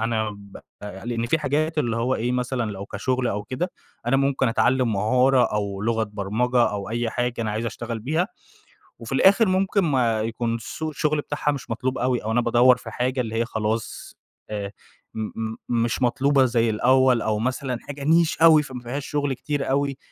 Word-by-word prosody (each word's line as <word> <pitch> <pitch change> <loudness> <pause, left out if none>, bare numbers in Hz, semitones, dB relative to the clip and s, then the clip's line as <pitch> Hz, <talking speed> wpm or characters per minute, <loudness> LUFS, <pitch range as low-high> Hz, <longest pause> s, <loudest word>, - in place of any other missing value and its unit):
أنا 110 -1 0
ب 100 -1 -12 0.3
أ 100 0 -8
لإن 120 -1 -2
في 160 - +2
حاجات 155 +2 -1
اللي 115 -5 0
هو 125 +3 +1
إيه 120 +2 -1
مثلًا 125 -3 -1
لو 100 0 -7
كشغل 125 +4 -1
أو 105 -1 -2
كده، 150 - -3 0.4
أنا 135 - +3
ممكن 135 -2 +1
أتعلّم 120 +1 +2
مهارة 125 +5 +3
أو 100 -1 -2
لغة 115 0 +1
برمجة 110 +5 0
أو 100 -1 -4
أي 115 0 -1
حاجة 120 0 -1
أنا 110 - -1
عايز 110 +2 -2
أشتغل 115 0 -5
بيها، 160 - -1 0.7
وفي - - -9
الآخر 200 +4 +5
ممكن 195 +2 +2
ما 120 -8 +1
يكون 115 +1 -2
سوق 155 +7 -5
الشغل 150 0 0
بتاعها 145 0 -1
مش 140 -3 -6
مطلوب 130 +3 -2
أوي، 125 -2 0
أو 110 - -2
أنا 120 - +2
بادوّر 120 +2 +5
في - - -9
حاجة 125 +1 -1
اللي 115 -1 -4
هي 115 +1 +1
خلاص 110 -1 -3 0.3
أ 105 -2 -4 0.5
م 110 -1 -3
م 110 0 -4 0.3
مش 120 +2 -1
مطلوبة 135 +2 +3
زي 115 -2 +2
الأول 125 +2 +3
أو 105 -1 0
مثلًا 130 0 -2
حاجة 145 -1 -8
Niche 165 0 +3
أوي 155 -2 +7
فما 130 -3 -8
فيهاش 130 +4 -5
شغل 145 -2 -1
كتير 145 +1 -3
أوي. 140 0 0
120 Hz, 190 wpm, -24 LUFS, 110-135 Hz, 0.7 s, أوي